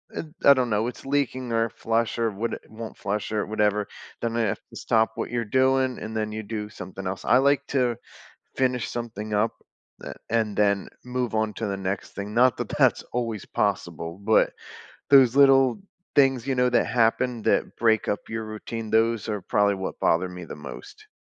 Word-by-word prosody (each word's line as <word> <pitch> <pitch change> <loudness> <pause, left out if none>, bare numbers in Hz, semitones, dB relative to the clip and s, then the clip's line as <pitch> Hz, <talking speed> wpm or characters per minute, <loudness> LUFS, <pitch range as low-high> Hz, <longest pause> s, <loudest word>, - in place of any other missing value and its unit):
eh - - -3 0.2
I 140 - +10
don't 130 -3 0
know, 110 +2 +1
it's 125 - -8
leaking 135 -3 -1
or 115 0 +2
flush 115 +2 -1
or 115 -1 +2
would 110 +4 -3
won't 110 0 -8
flush 105 +2 -3
or 105 -1 0
whatever, 105 -1 0 0.3
then 115 -1 -2
I - - +2
have 110 -4 0
to - - -14
stop 110 0 +2
what - - -4
you're 120 -1 -1
doing, 130 +2 +2
and 110 +1 -6
then 110 -1 -1
you 110 0 -4
do 105 0 -4
something 95 -1 -8
else, 95 +1 -4
I 125 - +5
like 140 +1 +3
to 125 -3 +1 0.6
finish 125 -2 0
something 110 -3 -5
up 105 +2 +2 0.5
a - - -6 0.2
and 110 -3 0
then 100 -2 +2 0.2
move 125 -2 -2
on 110 -1 0
to 110 - -3
the 100 -1 -2
next 95 0 -3
thing, 100 +1 -5
not 125 0 +4
that - - -3
that's - - +3
always 115 -4 -2
possible, 85 -5 -2
but 110 +1 +4 0.6
those 135 -4 +7
little 135 0 +5 0.3
things, 135 -4 +3
you 135 - 0
know, 125 0 +3
that 120 - +3
happen 120 0 +1
that - - +1
break 110 -2 +2
up 105 - +1
your 115 0 -4
routine, 110 +1 -6
those 115 -1 +2
are 105 -2 -2
probably 100 +2 +2
what 95 0 -5
bother 90 +3 +2
me 90 -1 -8
the - - -8
most. 70 -4 -11
115 Hz, 195 wpm, -25 LUFS, 105-125 Hz, 0.6 s, I